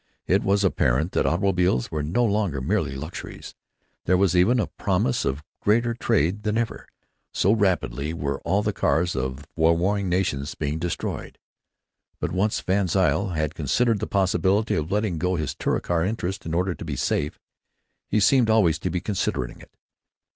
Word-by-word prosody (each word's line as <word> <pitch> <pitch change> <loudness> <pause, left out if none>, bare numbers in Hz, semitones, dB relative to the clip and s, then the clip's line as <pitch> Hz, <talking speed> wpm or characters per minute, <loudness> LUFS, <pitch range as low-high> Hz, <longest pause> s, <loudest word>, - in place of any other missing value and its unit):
It - - +2
was 100 +1 +2
apparent 80 -3 +1
that - - +1
automobiles 90 - +1
were 75 - -2
no 85 +12 +1
longer 100 -9 0
merely 65 +1 -1
luxuries. 75 +6 -8 0.5
There 90 - +3
was 95 -2 +2
even 110 +8 +4
a 105 - +1
promise 65 - -1
of 70 +3 -2 0.2
greater 115 +3 +2
trade 95 -3 +1
than 105 +1 -1
ever, 115 -1 -3 0.4
so 95 - +2
rapidly 85 - 0
were 70 -4 -3
all 95 +5 0
the 105 -1 0
cars 85 -1 +1
of 65 +1 -3
the - - -21
warring 90 +5 +2
nations 85 -5 -1
being 75 +1 -2
destroyed. 85 +1 -4 0.8
But, - - -2
once 100 +4 0
VanZile 95 0 +1
had 80 -1 -1
considered 105 - +1
the - - -3
possibility 95 +2 +1
of 80 +3 -2
letting 105 -5 0
go 90 +2 0
his 75 -5 -2
Touricar 85 -2 -1
interest 95 -2 -3
in 80 - -2
order 90 +1 +1
to - - -9
be 75 -4 -4
safe, 75 +3 -1 0.7
he 110 - +1
seemed 120 +3 +4
always 90 -9 +3
to 90 - -2
be 90 +1 -2
considering 95 - -2
it. - - -15
90 Hz, 170 wpm, -24 LUFS, 80-100 Hz, 0.8 s, even